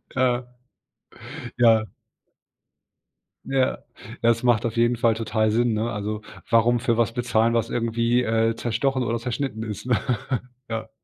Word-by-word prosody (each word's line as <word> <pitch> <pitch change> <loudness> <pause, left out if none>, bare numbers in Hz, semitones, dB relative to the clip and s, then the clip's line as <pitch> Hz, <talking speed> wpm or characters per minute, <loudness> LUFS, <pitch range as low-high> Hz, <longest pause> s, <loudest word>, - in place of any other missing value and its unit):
Ja. 125 -1 +2 1.2
Ja. 115 -2 +5 1.6
Ja, 135 -1 0 0.4
das 115 +1 +2
macht 120 -1 +3
auf 115 0 -3
jeden 120 0 +3
Fall 115 -1 +3
total 110 -1 0
Sinn, 115 +1 +2
ne? 110 +2 -1
Also, 105 +1 -3 0.3
warum 115 +1 +4
für 115 -1 0
was 115 -1 +2
bezahlen, 115 -1 +1
was 115 0 0
irgendwie, 115 +1 +1
äh, 115 0 +1
zerstochen 125 +3 0
oder 115 0 -1
zerschnitten 120 -1 -3
ist, 110 +2 -6
ne? 125 - +3 0.7
Ja. 110 0 -4
115 Hz, 135 wpm, -24 LUFS, 110-120 Hz, 1.6 s, Ja